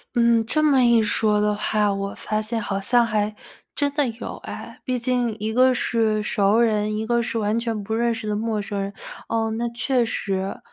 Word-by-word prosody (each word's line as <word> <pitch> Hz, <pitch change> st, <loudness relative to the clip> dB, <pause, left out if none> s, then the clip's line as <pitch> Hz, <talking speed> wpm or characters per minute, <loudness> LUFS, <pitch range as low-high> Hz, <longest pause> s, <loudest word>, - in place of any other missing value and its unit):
嗯， 235 Hz, -1 st, +3 dB
这 305 Hz, +7 st, 0 dB
么 280 Hz, -4 st, +4 dB
一 235 Hz, -1 st, +5 dB
说 210 Hz, -1 st, +2 dB
的 210 Hz, 0 st, +1 dB
话， 210 Hz, -1 st, +1 dB
我 200 Hz, 0 st, -3 dB
发 215 Hz, 0 st, -2 dB
现 225 Hz, +1 st, -3 dB
好 195 Hz, -2 st, -2 dB
像 235 Hz, +4 st, +3 dB
还 210 Hz, -1 st, -1 dB, 0.4 s
真 285 Hz, -1 st, 0 dB
的 290 Hz, -2 st, +2 dB
有 230 Hz, 0 st, -6 dB
哎， -, -, -8 dB
毕 255 Hz, -2 st, -1 dB
竟 240 Hz, -2 st, 0 dB
一 215 Hz, +1 st, -2 dB
个 255 Hz, +1 st, +5 dB
是 225 Hz, -3 st, +1 dB
熟 210 Hz, +1 st, +2 dB
人， 215 Hz, -2 st, +1 dB
一 215 Hz, +1 st, -2 dB
个 235 Hz, +1 st, +1 dB
是 230 Hz, -1 st, -2 dB
完 215 Hz, +2 st, 0 dB
全 225 Hz, -3 st, -3 dB
不 220 Hz, +2 st, -4 dB
认 235 Hz, +1 st, +1 dB
识 225 Hz, -1 st, -6 dB
的 210 Hz, -, 0 dB
陌 220 Hz, 0 st, -1 dB
生 200 Hz, 0 st, -4 dB
人， 200 Hz, +1 st, -4 dB, 0.4 s
哦， 225 Hz, -1 st, 0 dB
那 235 Hz, +2 st, -2 dB
确 240 Hz, +1 st, 0 dB
实。 195 Hz, -3 st, -3 dB
225 Hz, 225 characters per minute, -23 LUFS, 210-235 Hz, 0.4 s, 一